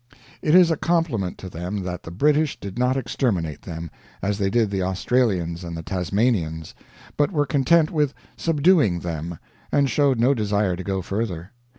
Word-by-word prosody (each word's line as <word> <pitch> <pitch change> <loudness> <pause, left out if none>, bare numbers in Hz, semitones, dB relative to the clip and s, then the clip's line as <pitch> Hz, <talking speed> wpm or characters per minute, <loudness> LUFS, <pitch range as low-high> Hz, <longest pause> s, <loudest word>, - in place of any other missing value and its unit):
It 155 +2 +3
is 180 -2 +7
a 160 - +1
compliment 155 - 0
to 95 - -8
them 90 +3 -4
that 90 -1 -4
the - - -9
British 150 - +1
did 100 +4 -7
not 125 +1 +2
exterminate 105 - -1
them, 80 -2 -7 0.3
as 100 +1 -1
they 100 -1 +1
did 110 -1 +1
the 95 -1 -1
Australians 95 -3 0
and 85 -1 -6
the 80 - -6
Tasmanians, 90 -3 -1 0.4
but 145 +5 +2
were 145 -5 +1
content 155 +3 +3
with 150 -4 0 0.2
subduing 150 - +3
them, 85 0 -4 0.3
and 140 -1 +3
showed 140 -2 +2
no 125 +4 +4
desire 105 -5 0
to 95 - -6
go 95 0 -2
further. 95 -2 -3
105 Hz, 175 wpm, -23 LUFS, 90-140 Hz, 0.4 s, is